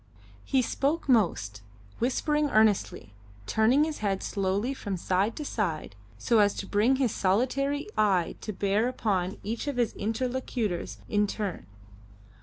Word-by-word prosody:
He 265 -2 +2
spoke 285 +7 -1
most, 135 - +1 0.4
whispering 295 +4 +1
earnestly, 210 - +2 0.3
turning 225 - +3
his 310 -1 -3
head 195 -3 -1
slowly 200 +6 -1
from 200 -7 -4
side 190 +5 0
to 300 - -5
side 170 - -2 0.2
so 220 - +2
as 205 -1 +4
to - - -4
bring 215 +7 +2
his 260 -4 +1
solitary 265 - 0
eye 190 -5 +2
to 215 - -4
bear 200 +3 +1
upon 195 -7 -1
each 225 +6 -4
of 285 -3 -2
his 240 -3 +1
interlocutors 225 -3 -2
in 210 0 +2
turn. 195 - -4
215 Hz, 140 wpm, -28 LUFS, 195-255 Hz, 0.4 s, as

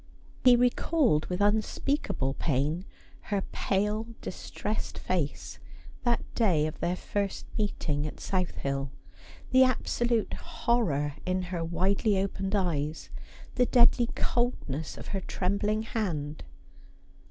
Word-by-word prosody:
He 250 -1 +8
recalled, 245 - +2
with 180 +2 -2
unspeakable 210 - +1
pain, 150 +6 0 0.4
her 200 -2 +1
pale 210 +3 0
distressed 210 +3 -4
face 170 -6 -2 0.4
that 240 -1 +1
day 180 -10 +3
of 155 - -4
their 175 +1 0
first 200 +1 -2
meeting 155 -8 -1
at - - -8
South 185 -2 -1
Hill; 135 0 -2 0.6
the 260 0 +7
absolute 240 -2 +1
horror 150 -12 0
in 185 0 0
her 170 -2 -1
widely 195 +5 +1
opened 195 +1 -1
eyes; 160 -5 -1 0.4
the 250 -1 +3
deadly 240 -1 +5
coldness 160 - -1
of - - -8
her 195 - -2
trembling 205 +4 0
hand. 160 -10 -3
195 Hz, 115 wpm, -29 LUFS, 155-225 Hz, 0.6 s, He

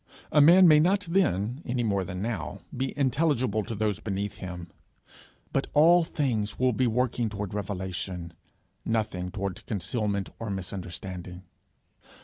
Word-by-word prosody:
A 150 - +6
man 175 +5 +8
may 155 -2 +7
not 190 +6 +3
then, 150 - 0
any 120 -1 -1
more 100 -4 +1
than 90 +1 -5
now, 110 -10 -4
be 130 +1 -1
intelligible 130 -5 +1
to 115 - -5
those 105 -2 0
beneath 100 0 -3
him, 90 -2 -7 0.8
but 135 - 0
all 170 +4 +6
things 120 -10 -1
will 130 0 +2
be 125 +3 +2
working 120 0 0
toward 100 -2 -5
revelation, 95 -3 -4 0.5
nothing 105 -5 -1
toward 100 0 -4
concealment 100 0 -2
or 115 - -4
misunderstanding. 90 -1 -6
105 Hz, 135 wpm, -27 LUFS, 95-130 Hz, 0.8 s, man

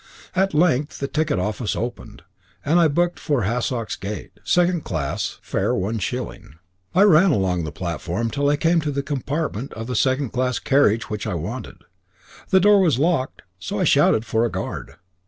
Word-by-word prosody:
At 190 -3 +1
length 150 -3 +2
the 140 - -3
ticket 155 -4 0
office 105 +4 -2
opened, 120 +1 -6 0.4
and 165 +4 +3
I 170 - +5
booked 175 +4 0
for 145 -6 0
Hassocks 115 +1 -1
Gate, 100 +1 -6
second 175 -2 +2
class, 70 -6 -3
fare - - 0
one 105 +5 -2
shilling. 125 - -5 0.4
I 190 - +6
ran 190 -1 +6
along 95 - +1
the 75 - -5
platform 85 +7 -3
till 145 0 +1
I 145 - +3
came 165 +3 +2
to 150 - -2
the 140 0 -2
compartment 140 -2 -3
of 115 - -6
the 125 +1 -4
second 130 +2 +1
class 125 -1 0
carriage 115 -6 +2
which 105 +1 -3
I 100 - -2
wanted. 80 - -6 0.7
The 190 - +5
door 205 +2 +6
was 160 -9 +3
locked, 150 -2 0 0.2
so 105 - -4
I - - +2
shouted 110 - +4
for 110 +1 +1
a 120 - +1
guard. - - -5
130 Hz, 180 wpm, -22 LUFS, 110-155 Hz, 0.7 s, I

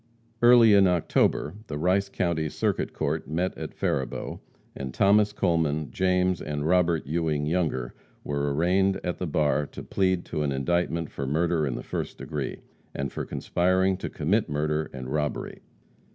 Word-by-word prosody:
Early 120 -2 +7
in 100 -1 +6
October, 85 -3 +1
the 75 - -4
Rice 95 +5 +1
County 85 -5 -1
Circuit - - -1
Court 75 -1 -2
met 90 +4 -1
at - - -7
Faribault, 65 -3 -2 0.4
and 65 -2 -6
Thomas 105 +1 +4
Coleman, 80 -7 0
James 90 -1 +1
and 75 0 -3
Robert 85 -1 +2
Ewing 75 -1 -1
Younger 75 -7 -1 0.3
were 70 0 -1
arraigned 95 +6 +2
at 90 -1 -3
the 90 - -2
bar 75 -1 +1
to - - -9
plead 95 -2 0
to 75 - -3
an 75 -1 0
indictment 85 +3 -1
for 70 - -4
murder 80 +1 +1
in 65 - -2
the - - -6
first - - -4
degree, - - -5 0.3
and 70 -1 -3
for - - -4
conspiring 95 +2 +1
to - - -5
commit 95 +8 0
murder 75 +1 -1
and 65 -1 -7
robbery. 75 -1 -3
80 Hz, 160 wpm, -26 LUFS, 75-90 Hz, 0.4 s, Early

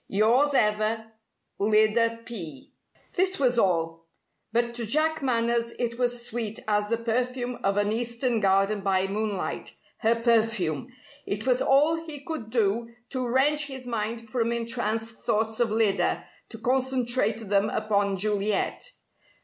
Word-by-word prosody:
Yours 245 +8 +3
ever 215 0 +1 0.5
Lyda 220 +2 +2
P." 165 - -7 0.4
This 375 -1 +2
was 250 -3 +3
all. 165 -3 0 0.4
But 235 +1 0
to 235 -2 -2
Jack 315 +6 +2
Manners 235 -2 0
it 235 0 -2
was 245 -1 -1
sweet 220 -2 -3
as 210 -1 +1
the 230 - +1
perfume 245 +2 -2
of 195 +1 +1
an 205 0 +1
Eastern 235 +1 0
garden 195 +1 +2
by 190 -1 +2
moonlight 205 0 -3 0.2
her 230 0 +3
perfume! 225 - +1 0.4
It 205 +2 -2
was 255 -1 +2
all 295 +4 +4
he 300 -2 -2
could 310 -10 -5
do 230 +1 0
to 255 -2 -2
wrench 290 +4 +3
his 265 -2 -7
mind 230 -1 -3
from 230 0 -1
entranced 230 -1 -1
thoughts 220 +1 0
of 240 -2 +2
Lyda, 205 -4 +1 0.2
to 225 - -8
concentrate 245 -3 0
them 200 +1 +2
upon 205 -3 0
Juliet. 210 - 0
230 Hz, 140 wpm, -26 LUFS, 210-245 Hz, 0.5 s, all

